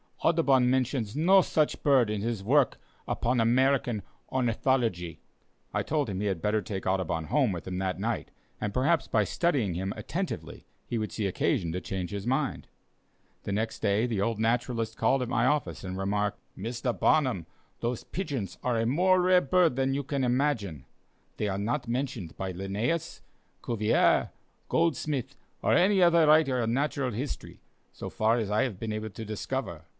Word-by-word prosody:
Audubon 140 -7 +4
mentions 130 -3 0
no 185 +6 +6
such 155 -3 0
bird 135 -5 +4
in 105 -1 -2
his 115 -2 -2
work 135 +5 +3 0.3
upon 125 +1 0
American 120 -2 +2 0.3
Ornithology." 115 - 0 0.5
I - - +1
told 150 -5 -1
him 95 -2 -3
he 105 - -1
had 95 -5 -2
better 105 +1 +1
take 95 0 -5
Audubon 95 -4 0
home 130 - +2
with 85 -1 -6
him 90 0 -3
that 95 -2 -2
night, - - -2 0.3
and 105 -1 -3
perhaps 145 +6 +2
by 110 - +2
studying 135 - 0
him 95 +3 -3
attentively - - -5 0.2
he 120 - -2
would 110 - -3
see 110 - -2
occasion 90 -2 0
to 90 +2 -3
change 95 -1 -4
his 100 +1 -5
mind. 135 +2 -1 0.8
The - - -4
next 110 +3 -2
day, 105 +2 +2
the 110 -5 -1
old 115 +1 0
naturalist 115 0 0
called 135 -1 +2
at 120 - -5
my 120 0 +2
office 150 +2 0
and 95 0 -5
remarked: 105 +1 -1 0.2
"Mr. 120 +4 -3
Barnum, 130 - +2 0.3
those 120 0 -2
pigeons 135 - -4
are 125 -2 +1
a 115 - +1
more 180 +9 +3
rare 180 0 +5
bird 170 -1 +3
than 135 0 +1
you 140 -1 -2
imagine. 125 - 0 0.5
They 105 - -1
are 95 -1 -2
not 120 +6 -2
mentioned 120 -7 -3
by 95 -1 -3
Linnæus, 100 - -2 0.4
Cuvier, 110 -2 +2 0.4
Goldsmith, 140 -5 0 0.3
or - - +3
any 190 +2 +4
other 170 -2 +5
writer 150 -5 +4
on 115 0 0
natural 140 -1 0
history, 125 +6 -6 0.3
so - - -7
far 110 +2 +2
as 110 -3 -2
I 105 +5 +3
have 115 -8 -3
been 110 -1 -3
able 110 0 -4
to 110 +2 -8
discover. 110 -1 -4
120 Hz, 170 wpm, -28 LUFS, 100-135 Hz, 0.8 s, no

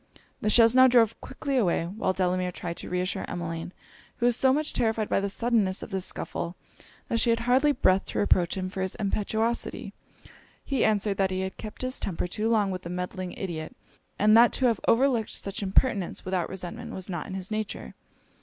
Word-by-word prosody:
The 215 - +1
chaise 230 +1 +6
now 260 0 +7
drove 230 -3 +3
quickly 280 -3 -3
away; 180 -8 +2
while 190 +2 -1
Delamere 185 -1 0
tried 170 -1 -6
to - - -7
reassure 180 +2 -1
Emmeline, 165 -1 -4 0.5
who 240 - 0
was 245 -1 +4
so 265 +2 +4
much 300 +3 0
terrified 220 -2 0
by - - +2
the 200 0 -2
suddenness 215 -3 0
of - - -9
this 190 -1 -2
scuffle, 170 +1 -4 0.5
that 230 - 0
she 235 - +2
had 230 0 +2
hardly 260 +5 +3
breath 190 -8 +2
to - - -6
reproach 185 -3 +2
him 185 -1 -2
for 190 - -4
his 190 -1 -2
impetuosity. 220 +3 -2 0.7
He 275 -2 0
answered, 205 -2 +1
that 195 -1 +2
he 185 0 -2
had 190 0 -4
kept 215 +3 -7
his 255 +1 -1
temper 180 -3 -3
too 210 +5 -2
long 210 -4 +2
with 185 -1 -4
the 170 - -8
meddling 180 +1 -4
ideot, 165 -5 -5 0.4
and 215 +1 +5
that 235 +1 +7
to 260 - 0
have 230 -4 +2
overlooked 240 -2 +2
such 195 +1 -5
impertinence 200 -1 +1
without 185 -2 -1
resentment 185 -2 -6
was 190 -1 -4
not 175 -5 -4
in 190 - -6
his 190 +2 -4
nature. 215 - -4
200 Hz, 200 wpm, -27 LUFS, 185-230 Hz, 0.7 s, now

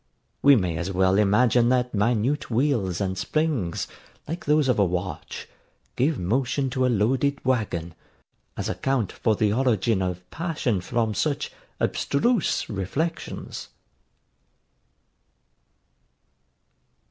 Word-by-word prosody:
We 140 0 +7
may 90 -7 0
as 90 +3 -3
well 95 0 +3
imagine 115 +4 +4
that 125 -1 +1
minute 115 +6 +1
wheels 115 - +1
and 95 -1 -1
springs, 130 - -1 0.4
like 165 +4 -5
those 150 -1 +3
of 125 -4 +2
a - - +6
watch, 90 0 -4 0.5
give 140 +3 +1
motion 130 +7 0
to 130 -1 +1
a - - +1
loaded 125 +6 +1
waggon, 100 -10 -1 0.6
as - - -2
account 135 -7 -1
for 110 -2 0
the 105 0 +1
origin 115 -4 +1
of 90 -1 -3
passion 150 - -1
from 115 +2 -1
such 145 +6 -1 0.3
abstruse 225 - +1
reflections. 110 - -4
120 Hz, 110 wpm, -25 LUFS, 95-135 Hz, 0.6 s, We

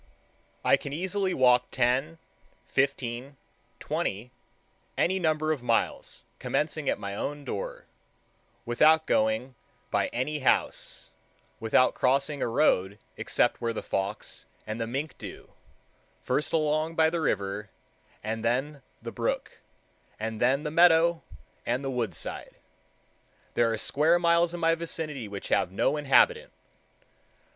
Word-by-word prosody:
I - - +6
can 140 - -7
easily 190 +4 -1
walk 125 -4 +4
ten, 130 +6 +1 0.5
fifteen, 135 0 -1 0.4
twenty, 105 +6 -3 0.7
any 190 +2 +2
number 155 -2 +1
of 150 -5 -2
miles, 115 -2 -1 0.2
commencing 155 -1 -1
at - - +1
my 100 -1 -5
own 145 +7 -4
door, - - -5 0.8
without 155 +6 +4
going 110 +4 +1 0.4
by - - +2
any 150 +5 -2
house, 130 - 0 0.5
without 115 +3 +3
crossing 140 +3 +1
a - - +1
road 100 -6 +2 0.2
except - - 0
where 115 -1 -1
the - - -5
fox 100 +2 -3 0.2
and 110 +2 -4
the 115 - -1
mink 140 +5 -4
do: - - -9 0.7
first 150 - 0
along 155 +1 +1
by 160 0 +4
the 170 -1 -1
river, 100 -5 -1 0.5
and 110 +1 -3
then 135 +5 -1 0.2
the - - -5
brook, - - -3 0.6
and 110 0 -4
then 135 +4 +3
the 150 - -3
meadow 170 0 +5 0.4
and 125 +4 -1
the 135 - -1
wood 115 -8 -2
side. - - -7 1.0
There 115 -1 +2
are 110 - -1
square 155 +9 +3
miles 170 0 +3
in 175 - -5
my 165 0 +4
vicinity 160 -6 -4
which 100 -1 -7
have - - +2
no 100 +9 +1
inhabitant. 465 - +3
140 Hz, 135 wpm, -28 LUFS, 115-160 Hz, 1.0 s, I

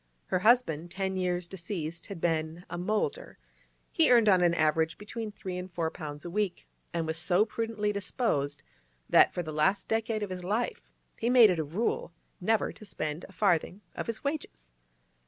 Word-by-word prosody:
Her 185 - 0
husband—ten 190 -4 +2
years 180 -1 0
deceased—had 170 0 -5
been 160 +1 -1
a - - -3
'moulder'; 215 - -2 0.5
he 320 -5 +4
earned 235 -3 +6
on 185 -3 +6
an 170 -1 +4
average 160 0 +2
between 215 +1 -6
three 185 -3 -5
and 180 +1 -7
four 165 -2 -1
pounds 150 -2 -7
a - - -4
week, 205 -2 -1 0.3
and 165 -1 -1
was 160 0 -2
so 175 +4 +3
prudently 225 -2 -2
disposed 185 - -1 0.4
that, - - +6
for 175 - -3
the 155 -1 -6
last 170 +7 +2
decade 225 -1 0
of 200 - -4
his 180 -1 -5
life, 215 +6 -1 0.4
he 235 - +1
made 240 -5 +8
it 175 - -1
a - - +1
rule 170 +4 -2 0.3
never 220 +4 +1
to - - -14
spend 155 -4 -4
a - - -13
farthing 190 -1 +1
of - - -5
his 230 -1 -4
wages. 280 - -4
185 Hz, 175 wpm, -29 LUFS, 165-215 Hz, 0.5 s, made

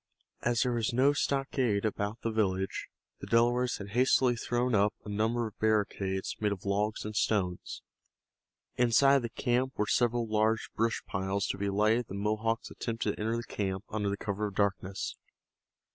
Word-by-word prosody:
As 120 -1 +2
there 125 - 0
was 115 -2 0
no 135 +4 +4
stockade 135 -7 0
about 105 +1 -2
the 115 - 0
village, 95 -3 -1 0.3
the - - -8
Delawares 120 +2 +2
had 100 0 -8
hastily 125 +2 +3
thrown 120 +2 -1
up 105 0 +3
a - - -7
number 110 +3 0
of 110 - -9
barricades 100 -3 0
made 105 -1 +1
of 100 -1 -5
logs 105 +2 0
and 105 0 -5
stones. 95 -5 -1 0.9
Inside 130 +3 +5
of - - 0
the 120 - -3
camp 125 +3 0
were 105 - +1
several 120 +1 +2
large 110 +1 +1
brush 115 +1 0
piles 95 +1 -1
to - - -2
be 100 0 0
lighted 105 +3 +3
if 125 - -5
the 95 - -7
Mohawks 110 +3 -1
attempted 115 -3 -2
to - - -15
enter 115 +2 0
the 120 - -3
camp 95 -3 -3
under 105 -2 -1
cover 105 0 -2
of 100 - -9
the - - -10
darkness. 100 -1 -1
110 Hz, 180 wpm, -30 LUFS, 100-120 Hz, 0.9 s, Inside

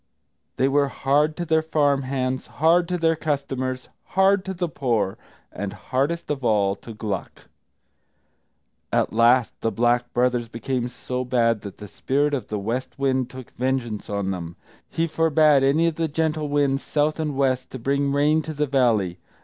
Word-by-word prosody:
They 130 - +3
were 140 +1 +2
hard 145 +3 +1
to 175 - -2
their 160 -1 +3
farm 145 -3 +1
hands, 130 -1 -2
hard 170 +3 +3
to 180 0 -1
their 165 -1 +2
customers, 135 -4 -3 0.3
hard 195 0 +4
to 190 - -3
the 175 0 -1
poor, 120 - -1 0.4
and 100 0 -5
hardest 140 +10 -2
of 140 -3 -3
all 100 -4 +2
to 115 - -11
Gluck. 105 -4 -5 1.5
At - - +1
last 120 +2 +4
the 115 - +1
Black 120 +3 +1
Brothers 120 -1 +1
became 120 +2 -3
so 125 +1 -4
bad 115 -3 +1
that 100 -2 -9
the 105 - -9
Spirit 145 +8 0
of 135 - -2
the 105 - -3
West 115 +6 -3
Wind 130 -2 0
took 130 -1 -10
vengeance 125 -4 -2
on 100 -2 -1
them; 85 -2 -5 0.3
he 165 - 0
forbade 155 -3 +3
any 145 +5 +3
of 165 -2 0
the 165 -1 0
gentle 155 0 -1
winds, 140 -1 +1
south 150 +1 0
and 150 -3 -2
west, 130 -2 +1
to - - -7
bring 140 +3 0
rain 150 +3 +3
to 155 0 -6
the 150 +1 +1
valley. 115 -10 +1
135 Hz, 175 wpm, -23 LUFS, 120-150 Hz, 1.5 s, hard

